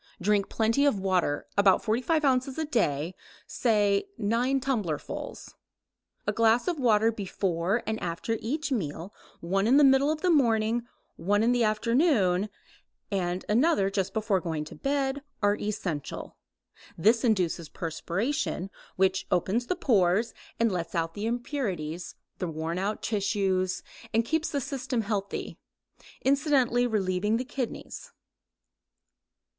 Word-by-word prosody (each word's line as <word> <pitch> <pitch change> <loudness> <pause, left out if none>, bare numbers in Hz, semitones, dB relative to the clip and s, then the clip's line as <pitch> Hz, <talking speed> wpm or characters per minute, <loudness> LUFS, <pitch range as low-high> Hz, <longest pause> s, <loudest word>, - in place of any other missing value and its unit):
Drink 200 +1 +1
plenty 225 +5 +2
of 220 -8 +2
water, 185 -6 0
about 200 -2 +4
45 255 +8 +1
ounces 260 +1 +1
a 320 - -1
day, 175 - 0 0.3
say 210 - +1
nine 240 +6 +1
tumblerfuls. 220 - -3 0.7
A - - +1
glass 230 +4 +3
of 345 -4 -1
water 225 -3 +4
before 195 0 -1
and 220 0 -3
after 175 +7 -2
each 295 +6 -2
meal, 175 - -3 0.3
one 195 +4 0
in 260 +4 +5
the 295 - +6
middle 270 +1 +5
of 310 0 -3
the 365 - +3
morning, 235 -4 +2 0.3
one 205 +5 +1
in 235 - +3
the 245 -1 +2
afternoon, 215 - +2 0.6
and 180 -2 -1
another 215 -4 +3
just 195 -1 -1
before 210 -3 0
going 160 -3 -3
to - - -10
bed, 275 0 -1 0.2
are 205 0 +4
essential. 180 -8 -4 0.6
This 220 +7 +3
induces 180 - +1
perspiration, 190 - -2 0.2
which 190 0 +1
opens 195 +7 +1
the 365 - 0
pores 215 - +2 0.3
and 230 -1 +3
lets 175 -2 -3
out 165 -1 -1
the 205 +4 -3
impurities, 195 - -3 0.2
the 180 - -2
worn 165 +2 -3
out 205 +3 -2
tissues, 195 -3 0 0.3
and 225 0 +3
keeps 320 +4 0
the 285 - -1
system 260 -2 -2
healthy, 200 -2 -3 0.6
incidentally 270 -3 +3
relieving 210 0 0
the 255 - -3
kidneys. 255 -2 -5
215 Hz, 135 wpm, -28 LUFS, 185-250 Hz, 0.7 s, the